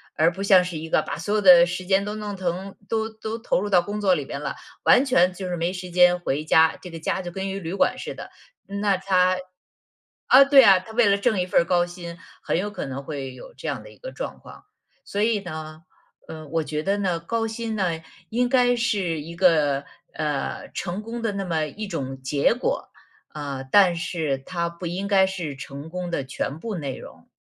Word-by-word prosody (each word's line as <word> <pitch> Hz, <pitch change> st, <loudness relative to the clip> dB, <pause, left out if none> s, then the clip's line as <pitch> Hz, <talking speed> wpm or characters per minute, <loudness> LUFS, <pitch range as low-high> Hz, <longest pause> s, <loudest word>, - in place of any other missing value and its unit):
而 160 Hz, +2 st, +4 dB
不 190 Hz, -, -8 dB
像 190 Hz, -2 st, +6 dB
是 180 Hz, -2 st, -5 dB
一 160 Hz, +1 st, -7 dB
个 -, -, +3 dB
把 -, -, -5 dB
所 205 Hz, +6 st, -2 dB
有 215 Hz, -, +2 dB
的 180 Hz, -3 st, +8 dB
时 180 Hz, +1 st, -5 dB
间 195 Hz, +1 st, +2 dB
都 210 Hz, +1 st, -4 dB
弄 210 Hz, -2 st, -5 dB
疼 185 Hz, +2 st, -4 dB
都 220 Hz, 0 st, -1 dB
都 220 Hz, 0 st, -6 dB
投 230 Hz, -, 0 dB
入 205 Hz, +2 st, -3 dB
到 185 Hz, -3 st, +5 dB
工 205 Hz, +4 st, -5 dB
作 190 Hz, -3 st, +3 dB
里 145 Hz, -, -3 dB
边 140 Hz, -, -6 dB
了， 140 Hz, -2 st, -4 dB, 0.3 s
完 255 Hz, -, +6 dB
全 185 Hz, -9 st, +3 dB
就 185 Hz, 0 st, -6 dB
是 175 Hz, -, -2 dB
没 170 Hz, +2 st, -1 dB
时 180 Hz, -1 st, -7 dB
间 180 Hz, 0 st, +5 dB
回 150 Hz, -2 st, -2 dB
家， 160 Hz, +1 st, +4 dB
这 180 Hz, -, -9 dB
个 165 Hz, -, -8 dB
家 165 Hz, +4 st, -2 dB
就 175 Hz, -, -6 dB
跟 190 Hz, +2 st, -4 dB
一 -, -, -3 dB
个 -, -, -3 dB
旅 170 Hz, -1 st, -5 dB
馆 -, -, +1 dB
似 -, -, -6 dB
的， -, -, -9 dB, 0.4 s
那 200 Hz, 0 st, 0 dB
他 185 Hz, -1 st, +2 dB, 0.9 s
啊， 270 Hz, +2 st, +8 dB
对 275 Hz, -1 st, +8 dB
啊， 195 Hz, -4 st, +7 dB
他 205 Hz, +4 st, -12 dB
为 235 Hz, -1 st, +4 dB
了 200 Hz, 0 st, +4 dB
挣 200 Hz, -2 st, +1 dB
一 -, -, -1 dB
份 180 Hz, -, +3 dB
儿 -, -, -2 dB
高 175 Hz, 0 st, +2 dB
薪， 175 Hz, -1 st, -9 dB, 0.2 s
很 -, -, -1 dB
有 205 Hz, +4 st, -2 dB
可 210 Hz, -, -5 dB
能 135 Hz, +1 st, -6 dB
会 135 Hz, -3 st, -5 dB
有 315 Hz, -, -12 dB
这 -, -, -8 dB
样 -, -, -3 dB
的 -, -, -12 dB
一 -, -, -18 dB
个 -, -, -9 dB
状 -, -, -6 dB
况。 -, -, -14 dB, 0.4 s
所 205 Hz, -, -3 dB
以 215 Hz, -1 st, +2 dB
呢， 155 Hz, -3 st, -8 dB, 0.5 s
呃， 155 Hz, -1 st, -8 dB
我 160 Hz, +2 st, -1 dB
觉 150 Hz, 0 st, -3 dB
得 195 Hz, +3 st, +1 dB
呢， 180 Hz, -4 st, 0 dB
高 225 Hz, +7 st, -2 dB
薪 225 Hz, 0 st, -4 dB
呢， 175 Hz, -5 st, -1 dB, 0.3 s
应 245 Hz, +2 st, +1 dB
该 245 Hz, -1 st, +3 dB
是 195 Hz, -8 st, 0 dB
一 165 Hz, +3 st, -8 dB
个， 150 Hz, -6 st, +3 dB, 0.3 s
呃， 150 Hz, -3 st, -3 dB
成 185 Hz, +2 st, -4 dB
功 230 Hz, +2 st, -6 dB
的 225 Hz, -3 st, -1 dB
那 200 Hz, 0 st, -3 dB
么 160 Hz, -3 st, 0 dB
一 215 Hz, +9 st, -6 dB
种 135 Hz, -6 st, -5 dB
结 140 Hz, -, +2 dB
果， -, -, -2 dB, 0.4 s
啊， 140 Hz, -3 st, -5 dB
但 185 Hz, +1 st, +5 dB
是 160 Hz, -5 st, -2 dB
它 170 Hz, +5 st, -3 dB
不 170 Hz, +1 st, -9 dB
应 185 Hz, +4 st, -3 dB
该 195 Hz, -1 st, +4 dB
是 175 Hz, -7 st, -4 dB
成 140 Hz, +3 st, -8 dB
功 180 Hz, +1 st, -5 dB
的 140 Hz, -, -1 dB
全 135 Hz, +2 st, -4 dB
部 220 Hz, +3 st, -4 dB
内 140 Hz, -6 st, -4 dB
容。 -, -, -13 dB
180 Hz, 245 characters per minute, -24 LUFS, 160-205 Hz, 0.9 s, 的